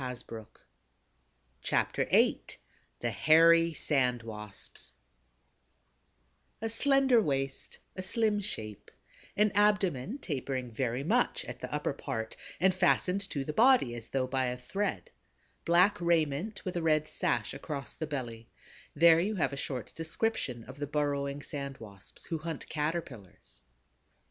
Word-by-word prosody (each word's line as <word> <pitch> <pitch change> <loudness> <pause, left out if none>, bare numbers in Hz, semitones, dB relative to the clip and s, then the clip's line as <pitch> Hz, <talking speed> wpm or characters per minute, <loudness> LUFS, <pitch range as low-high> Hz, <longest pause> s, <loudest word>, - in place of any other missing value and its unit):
CHAPTER - - +1
VIII - - +4 0.6
THE 120 - 0
HAIRY 165 - +5
SAND 125 -5 +1
WASPS 105 - -6 1.6
A 225 +1 -3
slender 270 0 +4
waist, 135 -5 -2 0.2
a 185 - -4
slim 210 +2 +1
shape; 110 - -5 0.5
an 210 0 +4
abdomen 205 - +2
tapering 130 - -3
very 125 +2 -1
much 155 - +1
at - - -7
the - - -6
upper - - -1
part 110 0 -4 0.2
and 190 +2 +4
fastened 185 +1 +2
to 140 -2 -3
the 150 - -3
body 240 - +5
as 115 -1 -7
though 130 -1 0
by 130 0 0
a 125 0 -2
thread; 195 +11 -3 0.5
black 180 +3 +4
raiment 170 +3 0
with 185 -1 -3
a 175 - 0
red 155 -1 +2
sash 110 -3 -1
across 140 0 -6
the 160 - -4
belly: 120 -6 -5 0.5
there 165 -1 +7
you 205 +5 0
have 145 -7 0
a - - -2
short 130 -4 -4
description 165 - -2
of 130 +4 -11
the 145 - -2
burrowing 145 -1 -1
Sand 140 -2 -5
Wasps, 100 -4 -10
who 165 - -3
hunt 160 -1 -5
Caterpillars. 150 - -4
150 Hz, 135 wpm, -31 LUFS, 125-180 Hz, 1.6 s, there